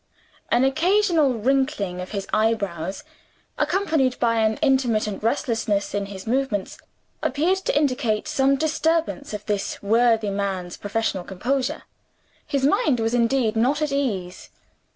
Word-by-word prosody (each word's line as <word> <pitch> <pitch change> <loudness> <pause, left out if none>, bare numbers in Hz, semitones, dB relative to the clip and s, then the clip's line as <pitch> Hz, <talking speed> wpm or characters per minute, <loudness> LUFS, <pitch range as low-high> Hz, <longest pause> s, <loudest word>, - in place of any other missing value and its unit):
An 240 +2 +3
occasional 325 -1 +3
wrinkling 230 -6 0
of 180 - -7
his 200 -2 -4
eyebrows, 200 - -1 0.6
accompanied 315 -10 +1
by 230 -1 +2
an 220 0 +2
intermittent 240 -7 +1
restlessness 225 -4 0
in 200 -1 -2
his 195 -1 -9
movements, 235 -5 -1 0.4
appeared 330 +8 +1
to 380 - -1
indicate 255 -7 0
some 270 0 +2
disturbance 315 0 0
of 210 -1 -6
this 205 -1 -2
worthy 225 0 +3
man's 195 -3 -3
professional 205 -2 -2
composure. 255 +9 -2 0.6
His 275 -2 0
mind 285 -2 +2
was 225 +1 0
indeed 235 -1 +2
not 255 +6 +2
at 305 -2 -1
ease. 200 -11 -3
235 Hz, 130 wpm, -23 LUFS, 205-275 Hz, 0.6 s, An